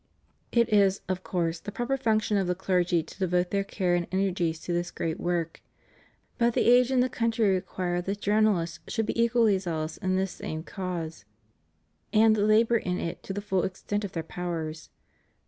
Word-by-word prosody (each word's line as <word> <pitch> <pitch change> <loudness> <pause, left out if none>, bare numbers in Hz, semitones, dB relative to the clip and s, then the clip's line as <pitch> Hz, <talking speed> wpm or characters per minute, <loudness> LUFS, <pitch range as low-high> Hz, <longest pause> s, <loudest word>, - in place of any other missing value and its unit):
It 235 -1 +3
is, 200 -2 +4
of 185 -1 -2
course, 170 -3 -1
the 205 - -7
proper 240 +5 -1
function 220 -4 +1
of 195 -2 +1
the 180 - 0
clergy 180 -2 +1
to 160 - -14
devote 180 -1 +1
their 200 0 +1
care 185 -2 -1
and 175 -1 0
energies 180 -4 0
to 175 - -3
this 175 0 -1
great 165 -2 -3
work; 170 -2 -2 0.8
but 235 0 +2
the - - +2
age 245 +1 +6
and 255 -2 +3
the - - +1
country 230 -4 +1
require 180 -1 -2
that 195 +3 -3
journalists 205 -6 +1
should 225 -2 -1
be 230 - 0
equally 230 -4 +3
zealous 160 -4 -3
in 185 0 -1
this 190 0 0
same 155 0 -6
cause 170 - -5 0.9
and 220 0 +5
labor 215 +3 +4
in 180 -4 -2
it 165 - -4
to - - -7
the 200 +1 -3
full 190 -2 0
extent 205 +2 -3
of 200 - -5
their 165 - -3
powers. 165 -2 -5
190 Hz, 185 wpm, -27 LUFS, 175-215 Hz, 0.9 s, age